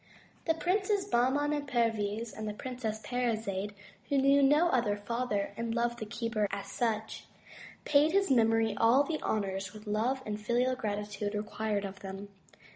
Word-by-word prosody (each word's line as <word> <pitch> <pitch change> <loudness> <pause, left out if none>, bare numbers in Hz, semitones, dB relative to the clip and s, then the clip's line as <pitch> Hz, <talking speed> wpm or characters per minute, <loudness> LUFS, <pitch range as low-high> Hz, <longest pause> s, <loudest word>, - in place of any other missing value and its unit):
The 325 - +2
Princes 385 +3 +1
Bahman 265 +5 +2
and 290 -1 -2
Perviz, 225 -3 0
and 215 0 -5
the 210 - -5
Princess 230 -3 -4
Parizade, 215 -5 -2 0.3
who 280 - +2
knew 275 +1 +5
no 295 +5 +5
other 220 -8 +1
father 210 -1 -2
and 230 0 -3
loved 240 0 0
the 220 - -5
keeper 220 -1 -1
as 200 0 -5
such, 220 -2 -2 0.6
paid 300 +1 +4
his 390 -4 +2
memory 225 -3 +3
all 235 +6 +5
the 310 +2 -3
honors 195 -2 -2
which 215 +1 -11
love 230 +6 0
and 210 0 -4
filial 245 +4 +1
gratitude 205 -2 -3
re 210 - -1
quired 210 -1 -2
of 195 0 -7
them. 195 +1 -7
225 Hz, 165 wpm, -31 LUFS, 210-260 Hz, 0.6 s, knew